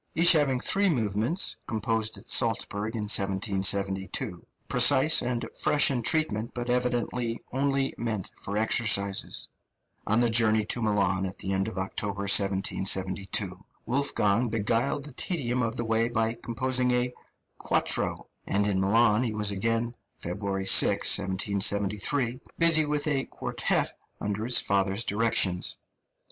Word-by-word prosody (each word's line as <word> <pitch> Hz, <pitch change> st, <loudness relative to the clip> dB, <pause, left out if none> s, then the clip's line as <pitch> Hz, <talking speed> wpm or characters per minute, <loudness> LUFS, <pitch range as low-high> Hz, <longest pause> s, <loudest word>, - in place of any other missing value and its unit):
each 170 Hz, +1 st, +5 dB
having 145 Hz, -6 st, +2 dB
three 200 Hz, +8 st, +2 dB
movements, 115 Hz, -, 0 dB
composed 110 Hz, -1 st, -2 dB
at -, -, -15 dB
Salzburg 110 Hz, -2 st, 0 dB
in 110 Hz, -, -3 dB
1772, 95 Hz, -2 st, 0 dB, 0.2 s
precise 145 Hz, +3 st, +4 dB
and 120 Hz, -1 st, -3 dB
fresh 150 Hz, -1 st, +2 dB
in 125 Hz, -3 st, -1 dB
treatment, 115 Hz, -5 st, 0 dB
but 120 Hz, 0 st, -3 dB
evidently 125 Hz, -1 st, -1 dB
only 135 Hz, 0 st, 0 dB
meant 110 Hz, -5 st, -4 dB
for 100 Hz, +1 st, -5 dB
exercises. 105 Hz, -3 st, +1 dB, 0.6 s
On 110 Hz, +2 st, +2 dB
the 120 Hz, -, +3 dB
journey 110 Hz, -2 st, +3 dB
to 120 Hz, -, -3 dB
Milan 100 Hz, -3 st, 0 dB
at 95 Hz, +1 st, -9 dB
the 95 Hz, -, -4 dB
end 95 Hz, +1 st, -1 dB
of 110 Hz, -, -7 dB
October, 100 Hz, +1 st, -4 dB
1772, 95 Hz, -1 st, 0 dB, 0.2 s
Wolfgang 120 Hz, -3 st, 0 dB
beguiled 115 Hz, +6 st, -1 dB
the 150 Hz, -, -11 dB
tedium 125 Hz, -6 st, -2 dB
of 115 Hz, 0 st, -2 dB
the 120 Hz, -, -2 dB
way 115 Hz, +1 st, 0 dB
by 115 Hz, -1 st, -1 dB
composing 125 Hz, +2 st, -1 dB
a 125 Hz, 0 st, 0 dB, 0.5 s
"quattro"; -, -, -1 dB, 0.2 s
and 100 Hz, +1 st, +1 dB
in 100 Hz, -2 st, 0 dB
Milan 110 Hz, +2 st, +3 dB
he 115 Hz, -4 st, -2 dB
was 105 Hz, -1 st, 0 dB
again 115 Hz, +4 st, -1 dB, 0.3 s
(February 95 Hz, +2 st, -4 dB
6, -, -, +5 dB
1773) 100 Hz, +6 st, 0 dB, 0.2 s
busy 165 Hz, -2 st, +4 dB
with 150 Hz, 0 st, -2 dB
a 140 Hz, -3 st, 0 dB
quartet -, -, -2 dB, 0.2 s
under 105 Hz, +1 st, -3 dB
his 120 Hz, +1 st, +3 dB
father's 100 Hz, +2 st, 0 dB
directions. 100 Hz, -5 st, +1 dB
110 Hz, 135 wpm, -27 LUFS, 100-125 Hz, 0.6 s, each